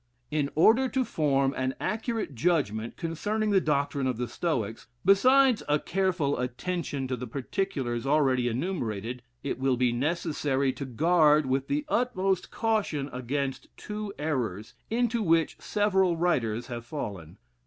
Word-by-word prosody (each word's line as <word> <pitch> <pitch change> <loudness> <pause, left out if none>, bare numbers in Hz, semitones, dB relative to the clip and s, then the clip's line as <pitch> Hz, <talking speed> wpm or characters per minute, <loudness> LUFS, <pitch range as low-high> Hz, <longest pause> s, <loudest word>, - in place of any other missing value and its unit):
In 150 -2 0
order 235 +10 +5
to 260 0 0
form 140 -8 +1
an 130 0 -1
accurate 225 - -2
judgment 120 -7 0
concerning 210 +6 -1
the 195 -2 +4
doctrine 140 -3 0
of 125 -3 -1
the 125 0 -2
Stoics, 120 - -2 0.2
besides 255 +5 +5
a 150 - +4
careful 175 -4 0
attention 135 +2 -3
to 130 - -1
the 125 +1 -6
particulars 135 - -2
already 135 -4 +3
enumerated, 120 - -3 0.2
it 140 - -3
will 130 -1 +1
be 125 -1 +2
necessary 140 -1 0
to 135 +2 -6
guard 155 +3 +4
with 130 +1 0
the 295 +1 -1
utmost 195 -9 0
caution 205 -11 -1
against 135 +2 -3
two 210 -1 -5
errors, 120 -10 -2 0.2
into 235 0 +1
which 165 -5 +2
several 190 -4 +2
writers 120 -10 0
have 120 -2 -6
fallen. 100 - -6
145 Hz, 140 wpm, -28 LUFS, 125-190 Hz, 0.2 s, order